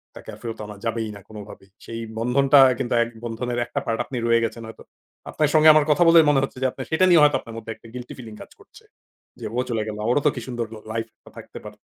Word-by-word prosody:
তাকে - - -12
আর - - -11
ফেরত 115 -1 -6
আনা 105 0 -9
যাবেই 115 -1 -2
না - - -10
কোনোভাবেই। 105 -2 -12 0.2
সেই 115 0 -7 0.2
বন্ধনটা 135 +4 +4 0.2
কিন্তু 120 -2 -2
এক 115 - -6
বন্ধনের 120 +1 -4
একটা 120 - -4
পার্ট 115 -1 -2
আপনি 130 - -6
রয়ে 115 0 +3
গেছেন 115 +1 -6
হয়তো। 110 - -13 0.5
আপনার 150 -2 0
সঙ্গে 155 0 +7
আমার 155 -1 +4
কথা 150 +4 +4
বলে 165 0 +7
মনে 145 - +3
হচ্ছে 135 - -5
যে 130 - +2
আপনি 130 - -9
সেটা 185 +4 +3
নিয়ে 170 -3 +6
হয়তো 150 - +4
আপনার 115 -1 -11
মধ্যে 115 0 -7
একটা 115 +1 -17
গিল্টি 125 -1 -8
ফিলিং 115 -4 -10
কাজ - - -12
করছে। - - -19 0.6
যে 115 - -7
ও - - +2
চলে 115 -2 -1
গেল, 105 -1 -5
ওরও 135 +4 +2
তো 150 - +6
কি 120 - -5
সুন্দর 120 -2 -3 0.3
লাইফ 115 0 -3 0.3
থাকতে - - -11
পারত। - - -13
120 Hz, 245 wpm, -23 LUFS, 115-140 Hz, 0.6 s, সঙ্গে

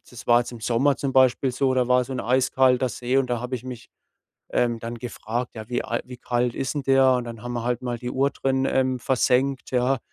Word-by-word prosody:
das 120 -1 -11
war 120 0 +6
jetzt 120 - -5
im 120 -2 -10
Sommer 125 +5 +2
zum 135 -1 -3
Beispiel 130 0 +3
so, 130 +1 +1
da 125 -1 +2
war 125 0 +4
so 130 +2 -7
'n - - -2
eiskalter 130 +1 +2
See 125 +3 -1
und 130 -2 0
da 120 -1 -1
habe 125 +2 -4
ich 125 0 -6
mich, 125 -2 -9 0.6
ähm, 120 -1 0
dann 115 +1 -5
gefragt, 120 0 -5
ja, 110 -1 -8
wie 125 0 -2
al - - -2
wie 125 0 -10
kalt 120 0 -1
ist 135 +1 -2
'n 145 - -2
der? 135 0 +4
Und 125 -1 +1
dann 115 -2 -8
haben 120 - -4
wir 120 -1 -3
halt 120 +1 -2
mal 120 -1 -3
die 125 +1 -5
Uhr 135 +2 +1
drin, 135 -1 -1
ähm, 130 -1 +1
versenkt, 130 +1 +1
ja? 125 +1 +1
125 Hz, 250 wpm, -24 LUFS, 120-130 Hz, 0.6 s, war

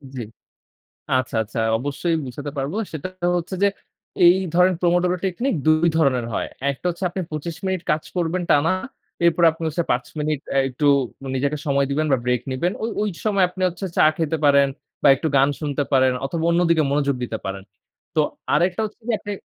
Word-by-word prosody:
জি। 125 - -4 1.0
আচ্ছা, 130 -2 -2
আচ্ছা 110 +2 -6 0.2
অবশ্যই 145 +6 -1
বুঝাতে 145 +3 -6
পারব। 140 +4 -2 0.2
সেটা 155 +3 -4 0.3
হচ্ছে 175 +2 -4
যে - - +6 0.6
এই 175 +1 +8 0.2
ধরেন 180 +1 +4
Pomodoro 175 +1 +2
Technique 190 +4 -1
২ 155 +2 +4
ধরনের 130 -6 +2
হয়। - - -1 0.2
একটা 140 - -12
হচ্ছে 175 +2 -5
আপনি 185 +2 -4
২৫ 155 +2 -4
মিনিট 190 -2 -1
কাজ 155 - 0
করবেন 175 0 0
টানা। 145 +4 +4 0.5
এরপরে 170 0 +4
আপনি 165 +1 -9
হচ্ছে 165 +3 -1
৫ 125 +2 0
মিনিট 150 -1 -1 0.2
এ - - +3
একটু 135 +3 -2 0.5
নিজেকে 140 +3 0
সময় 140 -1 +2
দিবেন 155 +3 +1
বা 135 - +4
ব্রেক 125 -1 +1
নিবেন। 150 +8 0
ও - - +1 0.2
ওই 210 - +1 0.2
সময় 200 -3 +3
আপনি 185 - -9
হচ্ছে 180 +2 -5
চা - - +6
খেতে 160 -1 0
পারেন 140 -1 +5 0.4
বা - - +6
একটু 160 +4 -2
গান 135 +1 +4
শুনতে 145 -1 -1
পারেন 130 -1 +4
অথবা 160 +4 -3
অন্যদিকে 170 -2 +3
মনোযোগ 140 -1 +1
দিতে 115 -2 -3
পারেন। 95 0 -5 0.5
তো - - +4 0.3
আরেকটা 180 +4 +2
হচ্ছে 215 +2 -10
যে 230 - +2
আপনি 205 - -6
155 Hz, 185 wpm, -22 LUFS, 140-175 Hz, 1.0 s, এই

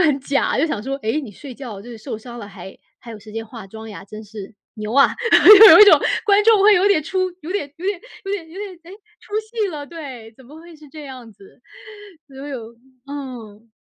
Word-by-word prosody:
就 - - +4
很 290 -3 +1
假， 275 0 -1
就 315 - +2
想 220 -9 -4
说： 270 +3 -4
“诶， 225 +8 -1
你 265 -8 -9
睡 260 +4 -11
觉 230 -7 -9
就 240 +4 -12
是 230 - -9
受 220 0 -7
伤 240 +1 -11
了， 205 - -9
还 190 -1 -12 0.2
还 235 - -13
有 215 - -10
时 215 +1 -15
间 225 +1 -5
化 220 -3 -11
妆 220 +2 -11
呀， 205 - -10
真 215 +2 -11
是， 210 -1 -11 0.2
牛 215 0 -6
啊！” 275 +1 +5 0.5
就 440 - +11
有 - - +8
一 - - +11
种 405 - +7 0.3
观 410 0 +4
众 440 -3 +5
会 420 0 +6
有 370 +3 +2
点 385 -7 +2
出 375 +5 -4 0.2
有 315 - -9
点 295 -8 -4
有 370 - -6
点 400 -3 -2 0.2
有 390 - -5
点 345 -5 -5
有 335 - -15
点， 405 -3 -7
哎， 340 - -15 0.3
出 - - -20
戏 435 -2 -4
了， 295 -4 -7
对， 265 -9 -10
怎 265 - -18
么 300 +6 -14
会 335 -1 -15
是 305 -1 -17
这 305 -2 -11
样 255 -4 -11
子， 200 +5 -20 0.7
所 270 - -18
有 235 -4 -8 0.3
嗯。 240 -6 -9
270 Hz, 260 characters per minute, -19 LUFS, 220-335 Hz, 0.7 s, 就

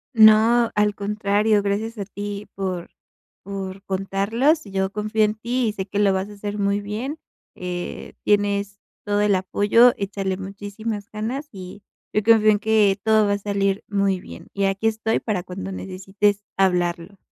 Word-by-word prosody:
No, 225 +2 +6
al 210 0 +2
contrario, 205 +1 +1
gracias 215 +3 -2
a 200 - -4
ti 205 +1 -6
por 185 -3 -4 0.5
por 195 0 -6
contarlos, 200 - +1
yo 190 -1 -1
confío 215 +1 0
en 210 - 0
ti 240 +2 -1
y 210 - -4
sé 190 -2 -4
que 205 +1 -2
lo 200 -2 +4
vas 190 +2 -2
a - - -10
hacer 205 0 -5
muy 200 0 +1
bien. 230 +10 -4 0.4
Eh, 180 -1 -6
tienes 200 -1 +1 0.3
todo 205 -1 +1
el 205 -2 +3
apoyo, 205 +6 +4
échale 195 -1 -2
muchísimas 205 +2 -6
ganas, 245 +8 -4
y 190 0 -10 0.3
yo 215 - +2
confío 220 -1 +6
en 205 - +2
que 215 -3 +3
todo 220 -1 +4
va 200 - +2
a 200 - 0
salir 200 -1 -1
muy 200 -2 +1
bien, - - -11
y 200 0 0
aquí 195 +3 0
estoy 220 0 0
para 210 -5 -2
cuando 95 - -6
necesites 195 - -1
hablarlo. 180 0 0
205 Hz, 165 wpm, -22 LUFS, 195-215 Hz, 0.5 s, No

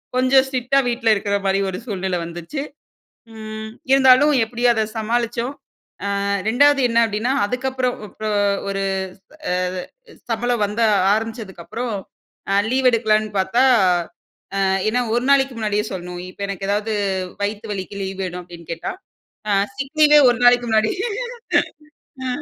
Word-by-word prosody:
கொஞ்சம் 260 +1 +4
ஸ்ட்ரிக்ட்டா 265 +1 +1
வீட்ல 235 -1 0
இருக்கற 200 -1 -1
மாரி 195 0 +2
ஒரு 185 - -4
சூழ்நிலை 190 -5 -2
வந்துச்சு. 170 - -6 0.7
ம் 220 0 -7 0.2
இருந்தாலும், 270 +2 +6
எப்படியும் 240 +2 +1
அதை 220 -1 +1
சமாளிச்சோம். 235 +3 -1 0.7
அ - - -2 0.2
2வது 285 +5 +4
என்ன 230 0 +1
அப்டின்னா, 220 +4 -1
அதுக்கப்புறம் 255 +2 -2
அப்றோ 215 +1 -5 0.4
ஒரு 195 0 -2 0.7
அ - - +1 0.8
சம்பளம் 240 0 0
வந்த 210 +3 -4 0.3
ஆரம்பிச்சதுக்கப்புறம், 225 0 -5 0.6
அ - - +3 0.2
லீவ் 260 0 +3
எடுக்கலான்னு 215 -2 +1
பாத்தா, 235 +7 +2 1.0
அ - - +2 0.3
ஏன்னா 245 +3 +1
1 240 - 0
நாளைக்கு 270 -2 +3
முன்னாடியே 210 -1 0
சொல்லணும். 180 -1 -6
இப்ப 185 - -19
எனக்கு 195 0 -4
ஏதாவது 210 +2 -1 0.5
"வயித்து 210 +2 -3
வலிக்கு 200 0 -6
லீவு 190 0 -5
வேணும்" 180 0 -5
அப்டின்னு 170 -2 -13
கேட்டா, 165 - -4 0.6
அ - - +3 0.2
சிக் 275 +3 -6
லீவே 300 0 +8
1 240 - -2
நாளைக்கு 245 0 +5
முன்னாடி 220 0 +3 1.3
அ. - - -2
225 Hz, 135 wpm, -21 LUFS, 200-250 Hz, 1.3 s, லீவே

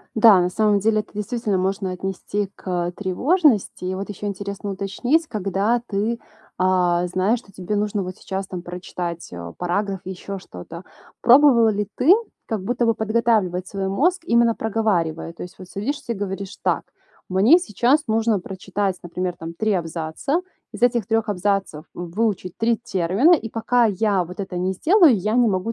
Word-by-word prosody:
Да, 220 -4 +7
на 180 - +2
самом 210 +1 +2
деле, 215 +1 +2
это - - -11
действительно 210 -1 -1
можно 190 +1 -1
отнести 195 +2 -3
к, - - -20 0.2
э, 175 - -5
тревожности. 225 - +1
И 185 - -2
вот 195 +1 -5
еще 205 0 -6
интересно 200 0 -4
уточнить, 205 - 0
когда 205 +3 0
ты, 220 +3 -1 0.4
а, 180 -1 +2
знаешь, 185 +6 +1
что 200 - -20
тебе 190 +2 -3
нужно 205 0 0
вот 185 0 -6
сейчас, 190 0 -5
там, 180 -2 -6
прочитать, 175 -1 -6
а, 85 -1 -7
параграф 190 - -2
или 190 - -5
еще 195 +2 -7
что-то. 165 - -10 0.4
Пробовала 245 -2 +6
ли 210 -1 0
ты 325 +9 +6 0.3
как 215 -4 -3
будто 240 +2 0
бы 230 - +3
подготавливать 215 -5 +1
свой 195 -1 -3
мозг, 340 - +1
именно 235 -4 +3
проговаривая? 195 -8 -1
То - - -9
есть 180 - -10
вот 185 -1 -11
садишься 235 +4 -3
и - - -4
говоришь: 195 0 -5
"Так, - - +1 0.5
мне 205 - +5
сейчас 270 - +1
нужно 220 -2 +1
прочитать, 190 +1 -3
например, 180 +1 -3
там, 165 0 -7
3 215 +5 0
абзаца, 165 - -2 0.3
из - - -9
этих 240 -4 +3
3 225 -1 0
абзацев 195 -5 -1
выучить 185 +1 -2
3 230 +1 +2
термина, 210 - +2
и 255 -9 +2
пока 235 +2 +2
я 200 -2 +1
вот 180 +2 -11
это 190 -2 -5
не 185 +1 0
сделаю, 330 - +5
я 210 +3 -1
не 245 -1 +4
могу, 190 +4 -1
200 Hz, 175 wpm, -22 LUFS, 185-225 Hz, 0.5 s, Да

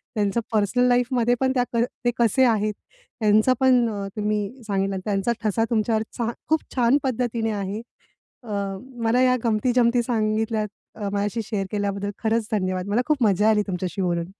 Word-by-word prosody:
त्यांचं 205 +1 +1
पर्सनल 225 +4 +2
लाईफमध्ये 245 -1 +2
पण 265 -1 +2
त्या 250 -2 +2
क 235 0 +3 0.2
ते 240 - +4
कसे 235 +2 +3
आहेत 215 -3 +1 0.5
त्यांचं 215 +3 +4
पण 250 -3 +4 0.3
तुम्ही 210 +3 -2
सांगितला. 195 -1 0
त्यांचा 200 +2 0
ठसा 220 +1 +1
तुमच्यावरचा 225 +1 -1 0.2
खूप 315 0 +3
छान 250 +1 +4
पद्धतीने 235 -3 -1
आहे. 200 +1 -3 0.6
अ, 230 - -12 0.5
मला 230 +3 +3
या 255 0 +4
गमती-जमती 240 +1 +2
सांगितल्यात 220 -1 0 0.3
अ, 205 -2 -4
माझ्याशी 205 +3 -1
शेअर 210 -3 -3
केल्याबद्दल 200 -1 -2
खरंच 225 0 +1
धन्यवाद. 185 -2 -1
मला 215 +4 +2
खूप 300 -5 +1
मजा 210 0 +3
आली 210 -1 +3
तुमच्याशी 185 0 -3
बोलून. 170 -2 0
220 Hz, 155 wpm, -24 LUFS, 205-240 Hz, 0.6 s, ते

